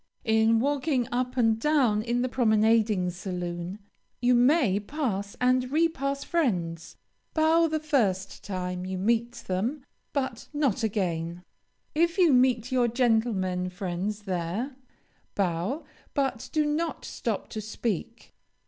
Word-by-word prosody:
In 220 0 +4
walking 275 -1 +1
up 250 +1 -1
and 225 -2 +3
down 255 -7 +3
in 240 +2 0
the - - +1
promenading 220 -5 +3
saloon, 175 0 -5 0.4
you 245 +1 +3
may 245 - +4
pass 205 -5 -3
and 255 0 +2
repass 280 -3 0
friends. 175 - -1 0.4
Bow 325 +1 +4
the 315 0 -1
first 210 -11 0
time 180 -2 -3
you 185 0 -4
meet 235 +4 +1
them, 235 +10 -2 0.3
but 265 -4 -3
not 285 -8 +1
again. 175 -5 -2 0.5
If 335 +3 +2
you 345 -6 +5
meet 250 -2 +3
your 250 -2 +3
gentlemen 220 -7 +1
friends 190 +3 -4
there, 190 +8 -3 0.6
bow, 195 - -1 0.3
but 270 -5 -1
do 305 -1 +2
not 315 +3 -2
stop - - -3
to 215 - -5
speak. 220 +1 -4
230 Hz, 125 wpm, -27 LUFS, 190-270 Hz, 0.6 s, you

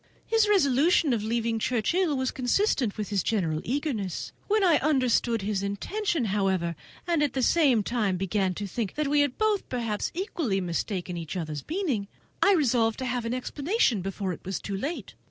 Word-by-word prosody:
His 445 -2 +3
resolution 300 -4 +4
of 225 - 0
leaving 225 +1 -1
Churchhill 285 - +1
is 260 - 0
consistent 255 - +1
with 210 -2 -3
his 200 -2 +1
general 165 -8 0
eagerness. 245 - -2 0.2
When 425 0 +2
I 340 -5 +5
understood 250 -6 +1
his 200 -1 -1
intention, 310 - -1
however, 190 -4 0 0.3
and 340 -3 +1
at 295 -3 +1
the 260 - 0
same 270 -8 +4
time 210 -5 0
began 190 0 0
to 205 - -4
think 205 +1 -4
that 305 -1 0
we 290 +1 +3
had 285 -3 +1
been 435 -1 +3
perhaps 230 -4 -2
equally 325 - -1
mistaken 180 0 -3
in - - -3
each 165 +3 -5
other's 155 -4 -4
meaning, 305 - -1 0.3
I 400 - +6
resolved 240 - +2
to 260 - -4
have 245 -1 -2
an 230 - -1
explanation 275 - 0
before 195 0 -3
it - - -11
was 190 +1 -3
too 200 - -4
late. 285 - -4
235 Hz, 185 wpm, -27 LUFS, 200-300 Hz, 0.3 s, I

